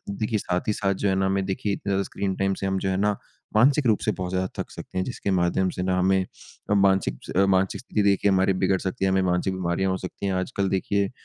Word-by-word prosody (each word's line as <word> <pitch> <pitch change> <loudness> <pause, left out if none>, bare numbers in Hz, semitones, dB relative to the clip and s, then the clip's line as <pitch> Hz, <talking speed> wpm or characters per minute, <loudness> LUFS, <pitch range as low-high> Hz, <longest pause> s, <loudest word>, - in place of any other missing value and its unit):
देखिए 110 +2 -1
साथ 90 +5 -2
ही - - +3
साथ 100 -2 0
जो 100 +1 -1
है 95 - +2
ना, 95 0 +1
हमें 95 0 0
देखिए 100 +1 -2 0.2
अ, 95 - +1
स्क्रीन 95 0 -3
टाइम 95 0 +1
से 95 - -4
हम 95 0 0
जो 95 - -2
है 95 - 0
ना, 105 +1 +1 0.4
मानसिक 135 +4 +4
रूप 110 -3 +4
से - - +2
बहुत 90 -1 -4
ज़्यादा 95 0 -1
थक - - -4
सकते - - -7
हैं 95 - +1
जिसके 120 -3 -3
माध्यम 95 0 +1
से 90 - -4
ना 90 0 +1
हमें 95 0 +3 0.5
मानसिक 95 -1 +2 0.2
अ, 95 - +5
मानसिक 95 0 +1
स्थिति 110 -4 -1
देखिए 100 0 +3
हमारी 95 0 +3
बिगड़ 95 0 +3
सकती 95 0 -2
है, 95 - +3
हमें 95 0 +2
मानसिक 90 +1 0
बीमारियाँ 95 +1 -1
हो 95 - 0
सकती 95 +2 -6
हैं। 95 - 0
आजकल 95 +1 -1
देखिए 100 +1 0
95 Hz, 250 wpm, -25 LUFS, 95-100 Hz, 0.5 s, अ